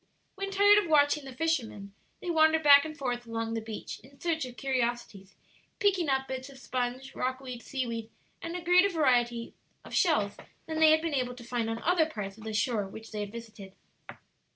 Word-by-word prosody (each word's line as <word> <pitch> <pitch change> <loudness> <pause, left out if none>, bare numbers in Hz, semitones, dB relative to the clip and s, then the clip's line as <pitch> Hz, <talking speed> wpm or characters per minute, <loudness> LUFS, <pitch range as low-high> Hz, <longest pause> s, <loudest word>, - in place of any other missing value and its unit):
When 395 0 -4
tired 405 +1 +6
of 350 - -3
watching 290 -1 +3
the 270 - -8
fisherman, 235 -11 -2 0.3
they 350 - -2
wandered 320 0 +4
back 285 0 +8
and 310 -1 -7
forth 245 -3 -3
along 225 0 -3
the 225 - -2
beach 220 -1 -7
in 270 +4 -19
search 320 -4 -1
of 245 -1 -12
curiosities, 240 -7 -2 0.4
picking 375 -6 +2
up 265 0 +1
bits 260 +1 -5
of 275 - -13
sponge, 255 0 -4
rockweed, 255 -1 -4
seaweed, 230 -5 -4 0.3
and 335 +1 -5
a 360 - -4
greater 360 +3 +5
variety 240 -8 +1 0.3
of - - -11
shells - - +2 0.3
than 315 -1 -3
they 320 -1 +7
had 315 +1 +4
been 330 -2 -2
able 250 -2 -1
to 245 - -11
find 235 -1 -2
on 225 0 -4
other 335 -2 +3
parts 200 -9 -6
of 220 0 -13
the 220 - -4
shore 210 -2 0
which 220 +3 -11
they 215 - -5
had 205 -1 -4
visited. 215 -4 -10
260 Hz, 200 wpm, -29 LUFS, 230-315 Hz, 0.4 s, back